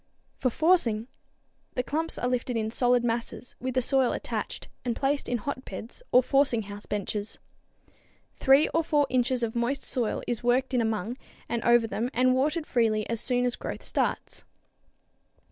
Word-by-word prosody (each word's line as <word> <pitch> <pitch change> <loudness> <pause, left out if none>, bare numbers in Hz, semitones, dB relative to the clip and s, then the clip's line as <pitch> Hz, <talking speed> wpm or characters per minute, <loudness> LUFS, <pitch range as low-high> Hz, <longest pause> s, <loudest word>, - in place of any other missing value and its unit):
For 255 - +2
forcing, 245 -7 +2 0.7
the 250 - 0
clumps 320 +5 -2
are 245 - -1
lifted 250 -1 -1
in 220 0 -1
solid 245 0 +2
masses, 235 +1 -3
with 255 0 -3
the 255 - +3
soil 265 -1 +3
attached, - - -4 0.2
and 240 -2 -1
placed 280 +3 0
in 245 - +1
hotbeds 245 - -6
or 250 - +6
forcing 265 -4 +3
house 205 +1 -9
benches. 210 +1 -3 1.0
Three 270 +2 +5
or 330 - +1
four 295 -2 +2
inches 250 -1 +1
of 225 0 -2
moist 245 +4 0
soil 240 -5 -1
is 240 -2 -2
worked 255 +2 +1
in 245 - +3
among 220 +2 -2 0.3
and 235 -1 -2
over 235 -1 +5
them 225 +2 -2
and 255 +1 +4
watered 300 +5 +1
freely 220 -5 +1
as 230 - 0
soon 250 -1 +1
as 245 - 0
growth - - -6
starts. - - -2
245 Hz, 165 wpm, -27 LUFS, 230-265 Hz, 1.0 s, or